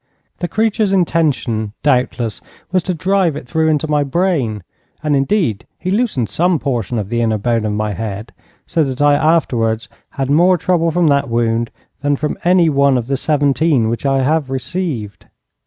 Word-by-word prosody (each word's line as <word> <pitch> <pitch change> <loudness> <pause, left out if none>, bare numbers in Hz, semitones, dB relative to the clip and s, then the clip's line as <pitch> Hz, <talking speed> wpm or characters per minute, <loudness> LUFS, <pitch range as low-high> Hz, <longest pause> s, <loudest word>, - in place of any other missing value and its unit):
The 175 - -2
creature's 220 0 0
intention, 145 - 0
doubtless, 125 -5 0 0.3
was 185 -1 +2
to 180 +1 -3
drive 185 -2 +1
it 125 - -8
through 160 +4 +1
into 155 0 +1
my 150 -1 +1
brain, 140 - -1 0.4
and 150 -1 +1
indeed 135 - 0
he 185 - -3
loosened 205 - 0
some 170 - +1
portion 120 -5 -2
of 100 -3 -3
the 120 0 0
inner 110 -2 +1
bone 115 +1 0
of 105 - -1
my 105 0 -1
head, 105 +1 -6 0.3
so 165 - +1
that 135 -1 -4
I 145 0 +4
afterwards 125 -8 +1 0.3
had 135 0 -1
more 175 +5 +4
trouble 170 0 +1
from 175 +1 +1
that 140 -3 +1
wound 115 0 0 0.3
than 145 0 +1
from 150 +2 -2
any 180 -1 +4
one 140 -3 +3
of 120 - -2
the 135 +2 -1
seventeen 145 -3 +1
which 115 - -3
I 135 -1 +1
have 150 0 +1
received. 130 - -4
140 Hz, 175 wpm, -17 LUFS, 115-165 Hz, 0.4 s, I